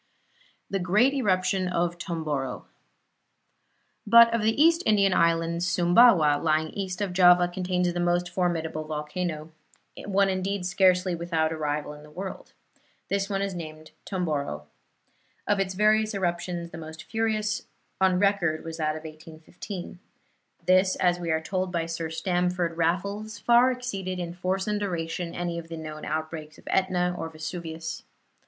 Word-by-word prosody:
THE 195 - -2
GREAT 210 +9 +3
ERUPTION 190 -6 +1
OF 175 -1 -1
TOMBORO 150 -7 -3 1.4
But 230 +2 +8
of 230 - +1
the 220 +4 +1
East 330 +2 +5
Indian 200 -3 +3
Islands 170 +1 +1
Sumbawa, 175 -4 +5
lying 155 0 +1
east 190 -1 -4
of 195 -3 -2
Java, 180 -1 +6
contains 180 0 -1
the 175 - -3
most 175 0 +1
formidable 165 -4 -1
volcano 155 +1 -4 0.5
one 200 0 +2
indeed 190 0 -2
scarcely 180 0 +3
without 165 -2 -1
a - - -2
rival 150 -1 -2
in 150 - -12
the 150 - -14
world. 190 +5 -8 0.6
This 200 0 0
is 195 -1 -1
named 155 -2 -8
Tomboro. 150 - -3 0.8
Of 205 -1 +1
its 190 -1 -1
various 215 +1 +3
eruptions 175 -2 -2
the 160 - -8
most 160 0 -9
furious 215 -2 -1 0.3
on 190 -1 +3
record 190 -5 +1
was 165 0 -6
that 155 -1 -1
of 155 - -8
1815. 165 +4 -9 0.7
This, 185 +1 +4
as 175 -1 +1
we 170 -1 -4
are 160 0 +2
told 185 +3 -2
by 170 -2 -1
Sir 165 -1 -4
Stamford 175 +1 -1
Raffles, 200 +6 -1
far 240 +4 +5
exceeded 195 -8 -4
in 175 -1 -4
force 185 +2 -2
and 210 -1 -1
duration 170 -3 -3
any 175 -1 -3
of 165 - -10
the 165 0 -7
known 155 -1 -7
outbreaks 155 0 -4
of - - -19
Etna 180 -2 +1
or 165 - -5
Vesuvius. 160 0 -6
180 Hz, 150 wpm, -26 LUFS, 160-195 Hz, 1.4 s, But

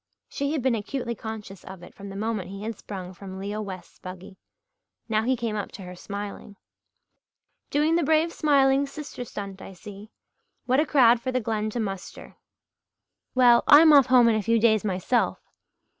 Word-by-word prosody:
She 280 0 -3
had 295 -6 -2
been 260 -2 +2
acutely 235 +2 -3
conscious 215 -3 -8
of 190 -2 -11
it - - -13
from 200 0 -10
the 195 - -9
moment 210 -3 -3
he 195 +1 -8
had 225 +1 -4
sprung 190 -2 -8
from 190 +1 -10
Leo 205 +2 -4
West's 190 -3 -9
buggy. 185 +1 -10 0.7
Now 215 -2 +1
he 255 +3 +1
came 230 -2 -3
up 205 - -4
to 195 - -9
her 180 0 -9
smiling. 200 +2 -7 1.1
"Doing 305 +3 +2
the - - +1
brave 315 +3 +2
smiling 280 -2 +3
sister 280 -3 -8
stunt, 200 -4 -8
I - - -10
see. 205 +3 -12 0.6
What 255 +2 +2
a 305 - +1
crowd 240 -4 +5
for 255 - -3
the 255 - 0
Glen 215 -2 -2
to 235 - -4
muster! 195 -4 -6 1.0
Well, 245 -2 +5
I'm 310 +1 +8
off 280 -3 +7
home 250 -2 +5
in 230 - +4
a 215 - 0
few 230 +2 +2
days 220 -2 +3
myself." 200 +4 0
220 Hz, 185 wpm, -25 LUFS, 200-255 Hz, 1.1 s, I'm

